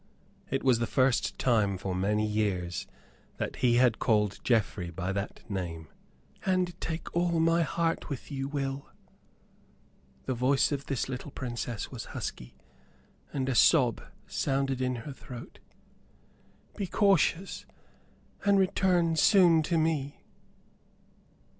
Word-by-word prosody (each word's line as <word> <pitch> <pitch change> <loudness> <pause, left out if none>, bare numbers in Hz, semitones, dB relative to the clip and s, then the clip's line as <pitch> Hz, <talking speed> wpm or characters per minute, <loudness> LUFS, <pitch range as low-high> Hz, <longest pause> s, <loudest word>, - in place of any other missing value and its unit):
It 135 - -1
was 130 -3 +4
the 115 - 0
first 130 +1 +1
time 105 -6 +2
for 95 0 -4
many 105 +4 +1
years 100 -5 -1 0.5
that - - -4
he 120 -1 +3
had 125 -2 +4
called 105 -4 +1
Geoffrey 110 -6 +1
by 90 +2 -3
that 100 +1 -5
name. 85 -5 -5 0.5
"And 185 -2 +1
take 165 +1 -5
all 170 -1 +2
my 165 +1 +3
heart 165 +1 -1
with 140 +1 -6
you, 135 -1 -3
Will." 140 -1 -3 1.4
The 130 - -1
voice 130 +4 +2
of 140 -1 -3
this 135 -3 -1
little 130 +2 -5
Princess 120 -4 -5
was - - -6
husky; - - -6 0.8
and 135 -2 -2
a 135 - +1
sob 125 -2 +4 0.2
sounded 135 -1 -1
in 125 0 0
her 145 - -6
throat. 125 -2 -10 1.2
"Be 200 -3 -3
cautious, 195 -1 +1 0.8
and 200 0 +4
return 180 -3 +2
soon 170 -1 +6
to 165 +2 0
me." 155 -3 -1
135 Hz, 130 wpm, -29 LUFS, 110-165 Hz, 1.4 s, soon